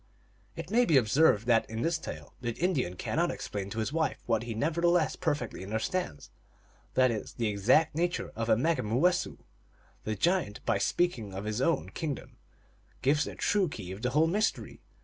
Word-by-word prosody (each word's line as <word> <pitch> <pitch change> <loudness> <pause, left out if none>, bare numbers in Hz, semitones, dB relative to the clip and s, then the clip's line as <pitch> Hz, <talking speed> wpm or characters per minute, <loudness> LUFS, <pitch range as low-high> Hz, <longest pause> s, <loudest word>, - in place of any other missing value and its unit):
It - - -7
may 245 +2 +5
be 160 -9 +4
observed 120 -1 +4
that 115 -2 +3
in 110 +1 -3
this 165 -1 +1
tale - - -8
the 120 -2 -2
Indian 140 - 0
cannot - - 0
explain 100 -1 -4
to 110 - -7
his 110 +5 -2
wife 160 -1 0
what 115 -2 +1
he 115 -1 -5
nevertheless 170 +5 +2
per 155 -4 0
fectly 120 -9 -7
understands; 110 - -3 0.6
that 130 -1 +4
is, 110 - -5
the 120 - -2
exact 110 +11 +3
nature 175 +3 -1
of 115 0 -2
a 110 - +5
Me 160 +8 +2
gumoowessoo. 145 - +1 0.7
The 110 - -2
giant, 170 - 0
by 115 -4 +1
speaking 115 - 0
of 95 - -4
his 110 +3 -2
own 165 +4 +1
kingdom, 150 -4 -5 0.7
gives 145 +3 +3
the - - -7
true 200 -4 +1
key 95 -9 -7
of 95 +3 -7
the 125 - 0
whole 150 +5 +3
mystery. 205 +6 -1
130 Hz, 185 wpm, -30 LUFS, 110-165 Hz, 0.7 s, may